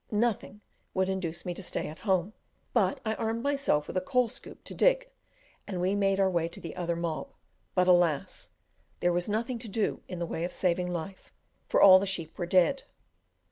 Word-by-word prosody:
Nothing 210 -2 -1 0.3
would 190 0 +1
induce 175 -3 -3
me 180 - -2
to 185 - -8
stay 180 - -4
at 155 +2 -9
home, 190 -1 0 0.4
but 195 -6 +2
I 220 - +1
armed 225 +1 -2
myself 275 - +1
with - - -8
a 185 - +2
coal 250 +4 +1
scoop - - -12
to - - -7
dig, - - +2 0.6
and 190 -3 -4
we 185 +2 +1
made 195 -1 +2
our 195 - +4
way 170 -3 +1
to - - -10
the 165 - -7
other 170 -2 -1
"mob;" 165 -2 -3 0.4
but, 180 -1 +3
alas! 175 -5 +2 0.5
there 175 0 +2
was 175 +3 -1
nothing 230 +3 -1
to 225 -2 -6
do 210 +1 -1
in 180 - -6
the 170 - -2
way 165 0 -4
of 175 - -3
saving 180 0 0
life, 175 +3 -6 0.4
for - - +2
all 185 -1 +10
the 200 - -2
sheep 170 -4 -3
were 175 - -2
dead. 185 +10 +3
185 Hz, 205 wpm, -29 LUFS, 175-215 Hz, 0.6 s, all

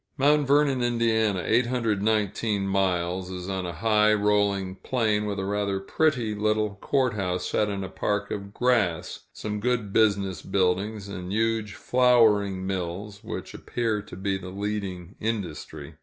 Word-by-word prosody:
Mt. 145 +1 +3
Vernon, 140 -2 +3
Ind. 120 -1 0 0.4
(819 110 -2 +1
miles), 90 -1 0
is 90 -1 -6
on 95 -2 -2
a - - -3
high, 105 +3 +3
rolling 100 -2 +1
plain, 110 -4 0
with 100 -1 -3
a 95 - -2
rather 100 -1 -1
pretty 120 0 +1
little 105 0 0
court 130 +4 +1
house 90 -3 -2
set 105 +2 +1
in 100 -1 -3
a - - -4
park 100 +2 -2
of 100 0 -5
grass, 105 -9 0
some 105 -1 -4
good 115 -3 -1
business 100 -5 +2
buildings, 100 +2 0
and 90 -2 -6
huge 110 -1 0
flouring 110 -7 +3
mills, 95 +3 -4
which - - -6
appear 115 -3 -2
to 105 - -11
be 95 +1 -2
the 90 -1 -8
leading 100 -2 -4
industry. 105 -8 -4
105 Hz, 145 wpm, -26 LUFS, 95-110 Hz, 0.4 s, Mt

